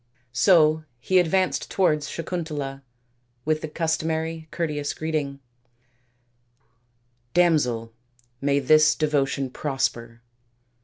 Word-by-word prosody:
So 155 +4 +4 0.2
he 185 +9 +3
advanced 185 +2 +1
towards 150 -6 +1
Sakuntala 150 -5 -4 0.6
with 155 0 +1
the - - -4
customary 160 0 -2
courteous 150 -3 -3
greeting, 150 -3 -3 1.0
" 120 0 -44
Damsel, 125 -10 +2 0.5
may 140 0 +2
this 155 +2 +5
devotion 140 -3 0
prosper." 120 -5 -3
150 Hz, 90 wpm, -24 LUFS, 125-160 Hz, 1.0 s, this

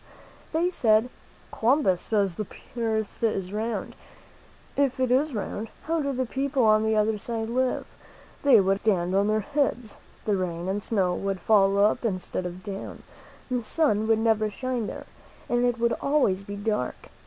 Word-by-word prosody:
They 340 +3 +1
said: 225 -4 +3 0.4
"Columbus 225 - +2
says 200 -4 0
the 210 +3 -5 0.3
earth 220 -3 -2
is 195 -4 0
round. 225 +2 -3 0.8
If 275 -2 +1
it 255 -1 +1
is 275 +1 +2
round, 210 +1 -4
how 330 0 0
do 280 -1 -1
the 260 -1 -1
peo 270 +3 -2
ple 265 -2 +2
on 215 0 +5
the 220 0 +1
other 215 0 +1
side 225 +1 -3
live? 255 +2 0 0.6
They 270 -6 +6
would 195 0 +2
have - - -19
to 220 - +6
stand 175 0 -2
on 200 +1 +3
their 215 0 +2
heads; 245 -3 -1 0.3
the 205 -2 +1
rain 175 -1 -3
and 195 +2 -1
snow 195 -4 +1
would 195 +1 -2
fall 200 0 +4
up 210 +5 +3
instead 185 -4 -2
of 180 +1 -9
down; 200 -2 -7 0.5
the 250 -1 +1
sun 220 -4 +1
would 225 -1 +4
never 220 -1 +2
shine 245 0 -3
there, - - -7 0.4
and 240 0 +2
it 245 -1 +1
would 235 0 +2
always 270 -10 +2
be 200 +1 -7
dark. 205 - -3
220 Hz, 180 wpm, -26 LUFS, 200-250 Hz, 0.8 s, They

